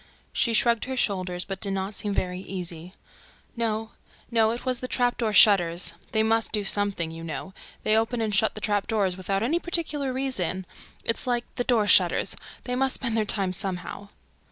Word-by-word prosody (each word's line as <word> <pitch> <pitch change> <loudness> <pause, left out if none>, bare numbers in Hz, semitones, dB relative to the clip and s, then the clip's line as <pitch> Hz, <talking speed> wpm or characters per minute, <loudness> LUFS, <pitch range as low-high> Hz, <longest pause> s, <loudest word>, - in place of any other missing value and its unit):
She 230 -3 +1
shrugged 235 0 +3
her 260 0 -4
shoulders, 185 -5 -1
but 195 -1 -6
did 200 -2 0
not 195 +2 -3
seem 205 -1 0
easy. 180 -2 -5 0.6
"No, 225 -1 -2 0.4
no, 225 -2 +4
it 235 +3 -4
was 255 -2 0
the 255 - -4
'trap 245 -1 +1
door 225 -3 +1
shutters.' 180 -5 +5 0.2
They 220 -1 +2
must 225 0 +1
do 210 -2 +1
something, 195 -4 +1
you 165 0 -8
know... 165 +4 -6 0.3
They 215 - +3
open 225 +2 +1
and 220 -2 -1
shut 215 +2 +2
the 215 - -6
trap 205 -1 0
doors 200 -5 +1
without 195 +2 -1
any 310 +9 +1
particular 305 -6 -1
reason... 225 -9 -1 0.4
It's 230 +3 -1
like 240 -1 0
the 245 - -1
'door 235 -4 +2
shutters:' - - +4 0.3
they 250 - -2
must 265 +1 +2
spend 235 -4 -2
their 220 -1 +1
time 195 -3 0
somehow." 195 +2 -3
215 Hz, 185 wpm, -26 LUFS, 190-235 Hz, 0.6 s, shutters